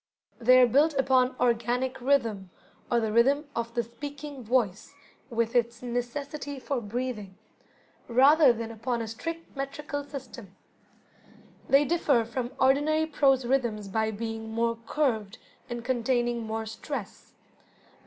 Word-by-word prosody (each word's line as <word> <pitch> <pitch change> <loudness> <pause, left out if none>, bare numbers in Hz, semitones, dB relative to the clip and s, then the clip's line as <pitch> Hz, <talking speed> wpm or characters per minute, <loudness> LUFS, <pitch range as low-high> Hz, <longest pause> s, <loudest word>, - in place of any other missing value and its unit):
They 255 +2 +6
are 250 - +8
built 290 +6 +3
upon 260 -1 +3
"organic 245 +2 0
rhythm", 230 -8 +1 0.4
or 240 - +3
the 220 -2 -1
rhythm 275 +7 +3
of 230 0 -3
the 235 - +1
speaking 285 +3 -8
voice 230 +1 0 0.3
with 230 -1 -1
its 235 0 +1
necessity 275 +4 -4
for 260 -1 -2
breathing, 215 -3 -4 0.7
rather 275 +4 +6
than 230 -1 -4
upon 230 +1 -2
a - - -6
strict 330 +10 -6
metrical 285 +1 -4
system. 255 -8 -10 1.1
They 280 +2 +5
differ 280 -7 +2
from 240 +1 -3
ordinary 290 +4 +3
prose 270 -4 +2
rhythms 235 -5 0
by 220 +2 0
being 225 +1 -5
more 230 +1 0
curved, 225 -8 0 0.3
and 240 -1 -5
containing 240 -1 0
more 220 0 -3
stress. 220 0 -7
245 Hz, 130 wpm, -28 LUFS, 230-275 Hz, 1.1 s, are